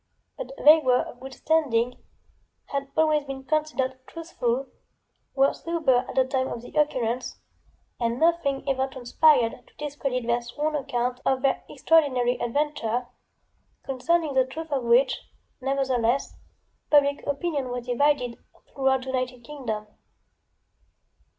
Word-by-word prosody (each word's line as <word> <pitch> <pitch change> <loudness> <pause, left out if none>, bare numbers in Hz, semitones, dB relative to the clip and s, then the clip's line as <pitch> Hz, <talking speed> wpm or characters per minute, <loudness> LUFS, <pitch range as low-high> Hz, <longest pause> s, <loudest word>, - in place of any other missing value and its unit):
But - - -7
they 310 +2 +7
were 255 -4 +3
of 245 - -11
good 265 0 -9
standing, 250 -6 +1 0.7
had 275 -1 -2
always 310 -2 +3
been 270 -1 -7
considered 275 -3 -1
truthful, 270 -6 -2 0.7
were 275 0 +4
sober 290 -7 +1
at - - -7
the 260 - +4
time 260 0 -1
of 235 - -6
the - - -11
occurrence, 255 -5 0 0.6
and 235 0 -1
nothing 320 -5 +1
ever 265 -1 +1
transpired 260 -1 +3
to - - -25
discredit 275 -4 -3
their 235 +1 +1
sworn 295 +6 -3
account 250 -3 -2
of 265 0 +1
their 275 - +1
extraordinary 255 -6 +2
adventure, 245 -2 -1 0.7
concerning 300 +4 0
the 260 -1 +3
truth 320 +4 -7
of 265 -4 -1
which, 240 +3 +4 0.4
nevertheless, 265 -2 0 0.5
public 285 -1 +4
opinion 285 -2 -2
was 245 -1 -4
divided, 250 -1 +1 0.3
throughout 265 -1 +2
the 265 - -7
United 255 -1 -3
Kingdom. 230 -6 -5
265 Hz, 130 wpm, -26 LUFS, 245-295 Hz, 0.7 s, they